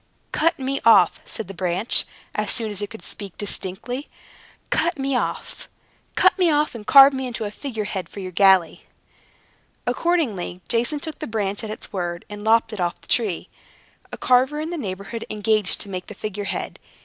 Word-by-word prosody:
"Cut 330 Hz, +2 st, +2 dB
me 270 Hz, +1 st, -2 dB
off!" 200 Hz, -7 st, +6 dB
said 220 Hz, -, -5 dB
the 195 Hz, -, -7 dB
branch, 185 Hz, +4 st, 0 dB, 0.3 s
as -, -, -1 dB
soon 225 Hz, -3 st, -1 dB
as 205 Hz, -1 st, -2 dB
it 205 Hz, -, -3 dB
could 220 Hz, -, -11 dB
speak 200 Hz, -3 st, -6 dB
distinctly; 205 Hz, +6 st, -3 dB, 0.6 s
"cut 340 Hz, 0 st, +2 dB
me 270 Hz, -1 st, -1 dB
off! -, -, -3 dB, 0.5 s
cut -, -, +5 dB
me 360 Hz, -2 st, +4 dB
off! 300 Hz, 0 st, +2 dB
and 215 Hz, -3 st, -9 dB
carve 275 Hz, 0 st, +9 dB
me 265 Hz, -1 st, -2 dB
into 235 Hz, -3 st, -4 dB
a 205 Hz, -, -4 dB
figure 225 Hz, -1 st, -4 dB
head 190 Hz, -4 st, -4 dB
for -, -, -9 dB
your 185 Hz, -1 st, -5 dB
galley." 190 Hz, -2 st, +4 dB, 1.0 s
Accordingly, 245 Hz, -, 0 dB
Jason 240 Hz, +6 st, 0 dB
took 315 Hz, +1 st, -6 dB
the 310 Hz, -, -4 dB
branch 205 Hz, -2 st, -1 dB
at 220 Hz, -, -5 dB
its 215 Hz, -, -8 dB
word, 175 Hz, -2 st, -3 dB
and 205 Hz, 0 st, -7 dB
lopped 225 Hz, +1 st, +3 dB
it 205 Hz, -, -4 dB
off 175 Hz, -1 st, -1 dB
the -, -, -17 dB
tree. 210 Hz, -8 st, 0 dB, 0.6 s
A -, -, -6 dB
carver 260 Hz, +4 st, +3 dB
in 315 Hz, +2 st, -3 dB
the -, -, -2 dB
neighborhood 200 Hz, -, -5 dB
engaged 210 Hz, -2 st, +1 dB
to 200 Hz, -, -7 dB
make 185 Hz, -1 st, -5 dB
the 210 Hz, -, -9 dB
figurehead. 205 Hz, -1 st, -4 dB
215 Hz, 185 wpm, -23 LUFS, 195-265 Hz, 1.0 s, carve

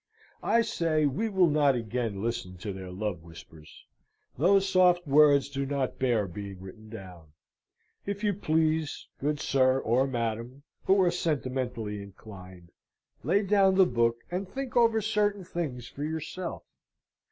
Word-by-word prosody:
I 230 Hz, 0 st, +3 dB
say 165 Hz, -8 st, 0 dB
we 150 Hz, +12 st, 0 dB
will 190 Hz, -3 st, +4 dB
not 145 Hz, -3 st, +3 dB
again 115 Hz, -3 st, -3 dB
listen 115 Hz, -6 st, -3 dB
to 100 Hz, +3 st, -5 dB
their 95 Hz, -1 st, -8 dB
love 95 Hz, -2 st, -4 dB
whispers. 80 Hz, -2 st, -14 dB, 0.5 s
Those 195 Hz, +7 st, +3 dB
soft 180 Hz, -2 st, +4 dB
words 145 Hz, -1 st, +5 dB
do 140 Hz, -1 st, -3 dB
not 135 Hz, -1 st, -2 dB
bear 120 Hz, -5 st, +1 dB
being 100 Hz, +1 st, -8 dB
written 110 Hz, +4 st, -12 dB
down. 90 Hz, -8 st, -11 dB, 0.7 s
If 200 Hz, +1 st, -4 dB
you 205 Hz, -1 st, +2 dB
please 160 Hz, -4 st, 0 dB
good 150 Hz, +1 st, -1 dB
sir, 130 Hz, -2 st, +2 dB
or 130 Hz, +1 st, +1 dB
madam, 120 Hz, +2 st, -4 dB, 0.2 s
who 195 Hz, +1 st, +4 dB
are 175 Hz, -, +3 dB
sentimentally 130 Hz, -, -2 dB
inclined 95 Hz, -3 st, -12 dB, 0.5 s
lay 195 Hz, +9 st, +2 dB
down 195 Hz, -1 st, +3 dB
the 190 Hz, -1 st, +6 dB
book 115 Hz, -4 st, +1 dB
and 185 Hz, +1 st, -3 dB
think 270 Hz, +3 st, -6 dB
over 230 Hz, -2 st, +4 dB
certain 205 Hz, -2 st, 0 dB
things 150 Hz, -9 st, -5 dB
for 145 Hz, -, -7 dB
yourself. 160 Hz, +3 st, -5 dB
135 Hz, 145 wpm, -28 LUFS, 110-180 Hz, 0.7 s, the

